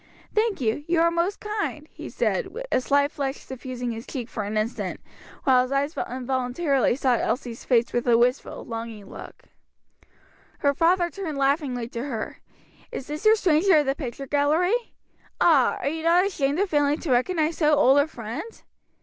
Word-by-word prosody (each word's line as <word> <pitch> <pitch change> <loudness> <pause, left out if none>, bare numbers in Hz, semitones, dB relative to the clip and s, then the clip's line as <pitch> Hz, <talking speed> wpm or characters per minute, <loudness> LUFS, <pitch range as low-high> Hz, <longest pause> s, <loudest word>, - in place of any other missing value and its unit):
"Thank 435 -3 +1
you, 235 +3 -1
you 340 -1 +2
are 335 +1 +4
most 340 +4 -1
kind," 415 -8 -4
he - - -9
said, - - 0 0.2
a - - +2
slight 285 +2 +2
flush 275 -1 -2
suffusing 255 -3 -6
his 225 0 -7
cheek 250 -4 -5
for 215 - -4
an 210 +1 -3
instant, 215 +3 -2 0.4
while 260 -3 +5
his 255 +1 -3
eyes 280 +3 0 0.2
involuntarily 260 +2 0
sought 255 -3 +1
Elsie's 240 -2 -3
face 240 -2 +2
with 240 +1 -1
a 235 -1 +5
wistful, 250 +3 0
longing 225 -3 -7
look. - - -11 1.1
Her 285 -1 +2
father 345 +3 +2
turned 330 -7 -5
laughingly 275 -4 0
to 235 -1 -5
her. 230 -6 -5 0.5
"Is 265 - -5
this 300 +6 -6
your 435 - +7
stranger 365 -2 +4
of 295 - +3
the 270 - +1
picture 275 -2 -6
gallery? 295 - +2 0.7
ah, 300 -7 +4
are - - -1
you 320 +2 -4
not 340 +3 +4
ashamed 290 -7 0
of 400 +2 +1
failing 290 -1 +2
to 310 - -2
recognize 315 +5 +1
so 300 -2 +4
old 280 -1 +5
a 285 - +3
friend?" 275 - -7
280 Hz, 175 wpm, -25 LUFS, 250-330 Hz, 1.1 s, your